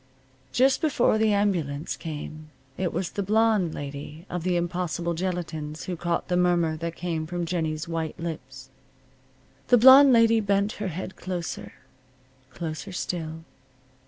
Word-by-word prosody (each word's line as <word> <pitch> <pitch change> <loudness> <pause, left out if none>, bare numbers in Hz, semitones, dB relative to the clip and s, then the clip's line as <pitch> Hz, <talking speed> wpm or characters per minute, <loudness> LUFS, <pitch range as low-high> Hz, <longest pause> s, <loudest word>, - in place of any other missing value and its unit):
Just 265 +2 +3
before 255 -8 +2
the 220 -1 +3
ambulance 170 -8 0
came 155 0 -7 0.3
it 185 -2 -1
was 185 - -3
the 200 - -3
blonde 210 -3 +2
lady 145 +3 -7
of 180 - -2
the 180 +1 0
impossible 175 0 -2
gelatines 160 -4 -4
who 180 - -4
caught 170 0 -2
the 180 - 0
murmur 175 -3 +2
that 170 +1 -4
came 165 -3 -3
from 175 +1 -3
Jennie's 160 -2 -2
white 165 -2 -3
lips. 130 -6 -7 1.0
The 245 - +6
blonde 265 +3 +9
lady 230 -1 +5
bent 200 0 +1
her 205 - -1
head 185 +2 -5
closer. 180 -2 -5 0.8
Closer 160 +6 -6
still. 165 -3 -4
175 Hz, 140 wpm, -26 LUFS, 160-195 Hz, 1.0 s, blonde